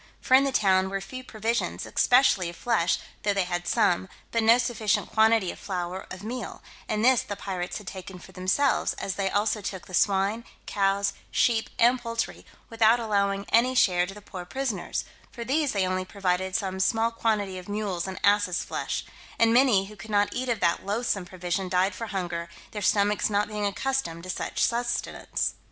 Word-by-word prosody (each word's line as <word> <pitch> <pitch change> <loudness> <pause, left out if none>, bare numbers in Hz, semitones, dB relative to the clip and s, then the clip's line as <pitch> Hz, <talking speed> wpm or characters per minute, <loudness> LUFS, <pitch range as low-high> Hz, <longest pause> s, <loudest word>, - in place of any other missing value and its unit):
For - - -1
in 270 +1 +7
the 275 - 0
town 190 -5 +3
were 195 0 -2
few 255 +7 -8
provisions, 230 0 -2
especially 245 -8 +3
of 170 - -9
flesh, 175 -7 +1 0.2
though 205 -1 +1
they 195 - +2
had 175 0 -3
some, 190 -3 +2 0.2
but 230 - +1
no 225 +2 +6
sufficient 235 -4 0
quantity 220 -4 +3
of - - -12
flour 180 -1 -4
of 185 +1 -8
meal, 235 0 -6 0.3
and 215 +1 +1
this 255 -2 +5
the 205 - -6
pirates 185 -3 -4
had 210 - -10
taken 185 0 -8
for 185 - -14
themselves, 185 +10 +1
as 195 - -4
they 195 0 -1
also 210 +2 0
took 190 -2 -5
the 185 - -13
swine, 200 +4 +2 0.2
cows, 195 0 +1 0.2
sheep, 225 -2 +2
and 245 +2 +4
poultry, 230 -1 -4 0.2
without 225 0 +4
allowing 200 -3 0
any 250 +3 +3
share 180 -7 +3
to 195 - -7
the 210 - -12
poor 185 -3 -7
prisoners; 235 -1 -3 0.3
for 235 - -6
these 285 +3 +1
they 195 -2 +1
only 185 0 -1
provided 185 -1 -1
some 190 -4 -2
small 225 +4 +2
quantity 210 -5 -1
of 180 - -12
mules' 200 -4 -2
and 190 - -6
asses' 205 -3 +3
flesh; - - -3 0.3
and 230 0 +4
many 240 -6 +4
who 210 +2 -11
could 210 +3 -11
not 205 -1 +2
eat 255 +1 -3
of 230 -3 0
that 170 - +2
loathsome 200 -1 -1
provision 180 +1 -3
died 185 +2 +2
for 230 +4 -5
hunger, 175 -4 -3 0.2
their 210 - -5
stomachs 205 +2 +2
not 205 0 +1
being 210 -1 -2
accustomed 200 -5 -2
to 185 - -3
such - - -2
sustenance. 240 0 -1
205 Hz, 190 wpm, -26 LUFS, 185-230 Hz, 0.3 s, in